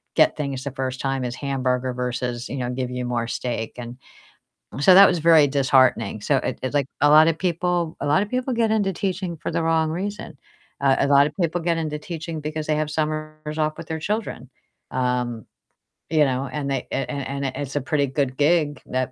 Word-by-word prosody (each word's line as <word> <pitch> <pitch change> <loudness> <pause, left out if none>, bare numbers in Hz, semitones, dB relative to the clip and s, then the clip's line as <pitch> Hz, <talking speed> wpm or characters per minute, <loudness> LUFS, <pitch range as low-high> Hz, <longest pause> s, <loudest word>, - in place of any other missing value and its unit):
get - - +4
things 140 -3 -3
the 140 - -3
first 130 0 -4
time 135 -1 -1
as 120 0 -4
hamburger 130 -2 -1
versus, 125 -1 -3
you 140 - -4
know, 125 -1 -2
give 125 0 -3
you 125 0 -3
more 120 -1 -2
steak, 120 -3 -3
and 120 +1 -7 0.8
so 185 +5 +7
that 195 0 +10
was 175 -2 +1
very 160 -2 +6
disheartening. 130 -6 +2
So 140 +5 +2
it 130 - -3
it 130 - -2
like 140 -2 +1
a 145 - +5
lot 155 +2 +7
of 160 - -1
people 175 -2 -1
a - - -1
lot 150 +7 +3
of 210 - -8
people 255 0 -1
get 225 -2 +1
into 200 -3 +1
teaching 185 -2 -3
for - - -4
the 165 0 -1
wrong 160 -1 +2
reason. 190 -4 -5 0.4
Uh, 135 -1 +4
a 140 - +2
lot 140 +1 +5
of 150 - -8
people 170 +1 0
get 170 0 0
into 150 -2 -3
teaching 160 -1 -6
because 155 +1 -4
they 155 - +1
have 155 0 -1
summers 155 0 -3
off 155 0 0
with 165 - -8
their 160 -1 -3
children. 205 - -3 0.4
Um, 125 -3 -1 0.6
you 155 -2 +4
know, 135 +1 -1
and 140 -1 -3
they 135 - -2
a 135 - 0
a - - -9
and 140 0 -4
it 130 - -2
it's 140 0 -5
a 145 - +1
pretty 140 -1 0
good 135 -1 -2
gig 150 -1 +2
that, 130 0 -2
145 Hz, 220 wpm, -23 LUFS, 130-160 Hz, 0.8 s, that